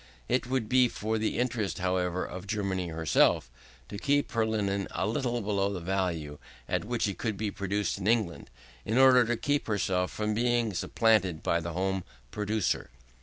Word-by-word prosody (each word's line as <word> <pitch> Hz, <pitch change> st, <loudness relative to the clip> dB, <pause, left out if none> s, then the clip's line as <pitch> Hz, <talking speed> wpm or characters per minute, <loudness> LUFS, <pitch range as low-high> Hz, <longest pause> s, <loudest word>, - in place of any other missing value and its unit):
It 125 Hz, -, 0 dB
would 130 Hz, -3 st, -1 dB
be 125 Hz, +1 st, +5 dB
for 110 Hz, -1 st, -2 dB
the 110 Hz, -, -1 dB
interest, 120 Hz, -5 st, -1 dB
however, 90 Hz, 0 st, 0 dB
of 90 Hz, +2 st, -8 dB
Germany 100 Hz, -3 st, -1 dB
herself, 80 Hz, -6 st, +2 dB, 0.4 s
to 100 Hz, -, -7 dB
keep 145 Hz, +4 st, +1 dB
her 115 Hz, -2 st, +1 dB
linen 100 Hz, -3 st, -1 dB
a -, -, -2 dB
little 120 Hz, +3 st, -1 dB
below 100 Hz, -1 st, 0 dB
the 95 Hz, -, -4 dB
value 85 Hz, -5 st, -2 dB, 0.3 s
at -, -, -1 dB
which 120 Hz, -1 st, 0 dB
it 100 Hz, -3 st, -4 dB
could 110 Hz, -4 st, -2 dB
be 105 Hz, -1 st, -2 dB
produced 100 Hz, +1 st, -2 dB
in 95 Hz, -, -3 dB
England, 110 Hz, -, 0 dB, 0.3 s
in 110 Hz, -, -1 dB
order 130 Hz, -1 st, +7 dB
to 120 Hz, +1 st, 0 dB
keep 145 Hz, +4 st, 0 dB
herself 95 Hz, -3 st, 0 dB
from 105 Hz, 0 st, -2 dB
being 120 Hz, -1 st, +1 dB
supplanted 95 Hz, -3 st, +2 dB
by 85 Hz, -, +2 dB
the 85 Hz, 0 st, -5 dB
home 95 Hz, +1 st, -1 dB, 0.3 s
producer. 105 Hz, -2 st, -1 dB
105 Hz, 175 wpm, -29 LUFS, 95-115 Hz, 0.4 s, order